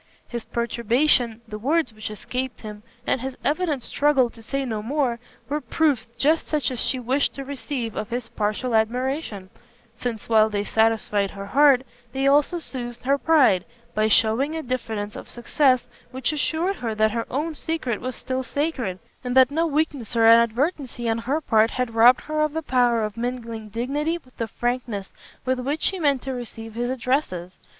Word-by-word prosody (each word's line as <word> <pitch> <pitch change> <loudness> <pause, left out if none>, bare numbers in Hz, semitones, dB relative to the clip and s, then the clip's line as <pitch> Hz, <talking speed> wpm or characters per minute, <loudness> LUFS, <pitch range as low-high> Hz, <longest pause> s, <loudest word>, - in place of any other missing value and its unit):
His 235 -2 -5
perturbation, 235 0 +1
the 210 -1 -6
words 300 +2 +1
which 215 0 -6
escaped 250 +5 -4
him, 210 -1 -8 0.2
and 255 - 0
his 265 0 -5
evident 300 -3 0
struggle 275 -5 +2
to 225 - -14
say 275 +4 -2
no 220 -4 -3
more, 250 0 0 0.3
were 295 +2 -2
proofs 285 -9 +1
just 310 +3 +2
such 295 -5 0
as 250 - -4
she 260 - +1
wished 260 +4 +1
to 275 - -6
receive 250 -3 -4
of 215 - -4
his 240 -1 -3
partial 215 +4 -2
admiration, 225 -3 -1 0.4
since 235 -2 -5
while 220 -1 +5
they 205 -1 -1
satisfied 220 -2 +1
her 195 0 -7
heart, 275 +2 +5 0.3
they 270 0 0
also 290 +5 +4
soothed 245 -7 -6
her 275 +2 +2
pride, 275 - +4 0.3
by 215 0 +2
shewing 230 +8 +3
a 320 - -3
diffidence 225 -4 -3
of - - -9
success 255 +1 +2 0.2
which 260 +3 -1
assured 330 +6 0
her 225 -3 -3
that 215 0 +3
her 230 +1 -2
own 305 +5 -2
secret 300 -8 -2
was 255 +1 -4
still 260 0 -3
sacred, 260 - -2 0.3
and 250 0 -2
that 260 0 +7
no 325 +3 +1
weakness 290 -6 -1
or 225 -1 +4
inadvertency 240 +3 +3
on 225 0 +1
her 265 +7 -1
part 225 -7 +3
had 250 -2 -2
robbed 240 +3 +6
her 305 0 -2
of 305 -1 +1
the 320 0 -2
power 245 -4 +2
of 215 +1 -4
mingling 230 -2 -4
dignity 285 +9 -1
with 255 -7 -21
the 230 - -2
frankness 240 -3 -3 0.3
with 260 0 +1
which 285 +5 -2
she 380 - +1
meant 285 -5 +2
to 265 - -3
receive 225 -2 -7
his 240 +2 -2
addresses. 245 - -1
250 Hz, 180 wpm, -24 LUFS, 225-280 Hz, 0.4 s, that